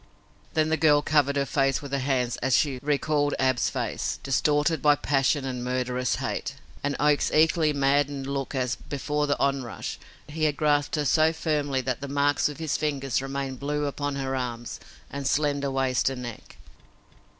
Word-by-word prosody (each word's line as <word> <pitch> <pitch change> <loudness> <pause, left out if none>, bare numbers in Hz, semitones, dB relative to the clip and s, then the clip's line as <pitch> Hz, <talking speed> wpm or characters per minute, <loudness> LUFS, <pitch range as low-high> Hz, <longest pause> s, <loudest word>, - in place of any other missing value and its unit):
Then 155 0 +2
the 160 - +2
girl 145 -2 +5
covered 145 -2 +2
her 140 -1 +1
face 135 0 +1
with 140 -2 -9
her 140 - 0
hands 130 -2 0
as 130 0 +2
she 140 -5 0
recalled 145 0 +1
Ab's 130 -2 +2
face, - - -2
distorted 150 +4 +1
by 150 -1 +5
passion 135 0 +1
and 125 -2 -4
murderous 125 0 -1
hate, - - -3 0.3
and 145 0 0
Oak's 150 -1 +3
equally 160 0 +3
maddened 140 0 +1
look 135 -1 -3
as, 125 -1 0
before 150 +1 -2
the 145 - +1
onrush, 135 -4 -2 0.3
he 155 +1 -1
had 150 -2 0
grasped 145 -1 +2
her 150 -1 -1
so 155 +3 +4
firmly 150 -4 -1
that 130 0 -3
the 140 - -4
marks 145 +1 +2
of 150 - -8
his 160 -2 -1
fingers 140 -4 -1
remained 135 -1 -4
blue 150 +1 -1
upon 145 0 -3
her 135 -1 -2
arms 120 -2 -4 0.3
and 140 -1 -3
slender 145 -1 +1
waist 135 -1 +1
and 130 -2 -6
neck. 120 -2 -9
140 Hz, 175 wpm, -26 LUFS, 135-150 Hz, 0.3 s, girl